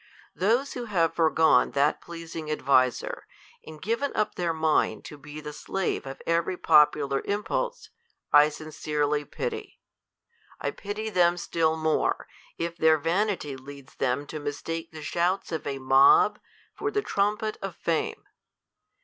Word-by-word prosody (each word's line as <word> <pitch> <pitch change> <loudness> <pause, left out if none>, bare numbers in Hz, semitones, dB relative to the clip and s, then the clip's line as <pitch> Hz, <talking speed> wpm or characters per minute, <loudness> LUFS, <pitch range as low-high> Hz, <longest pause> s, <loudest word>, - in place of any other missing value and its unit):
Those 235 +9 +1
who 245 -1 -5
have 170 -7 +1
forgone 160 -1 +3
that 140 +2 +2
pleasing 165 -2 -7
adviser, 130 -4 +1 0.4
and 155 -1 -11
given 230 - -1
up 215 - 0
their 175 -2 -1
mind 160 -1 +1
to - - -8
be 150 +1 -10
the 150 -1 -7
slave 175 -1 -3
of 135 - -8
every 170 +2 0
popular 150 -4 +4
impulse, 480 - -2 0.4
I 145 +1 +8
sincerely 150 -1 -2
pity. 445 - -5 0.4
^ - - -61 0.3
I - - -2
pity 215 +2 -5
them 175 -2 +3
still 160 -2 0
more, 160 -1 0 0.3
if 170 0 -3
their 160 -1 +5
vanity 170 -2 -1
leads 135 0 -12
diem 130 +2 -1
to 155 +2 -6
mis 145 0 -5
take 165 0 -4
the 155 -1 -9
shouts 175 +5 0
of 160 -3 -4
a 140 -1 -2
mob 135 +10 +5 0.3
for 420 - -2
die 420 0 0
trumpet 210 - -1
of 195 -3 -5
fame. 165 -2 -2
160 Hz, 150 wpm, -27 LUFS, 150-195 Hz, 0.4 s, I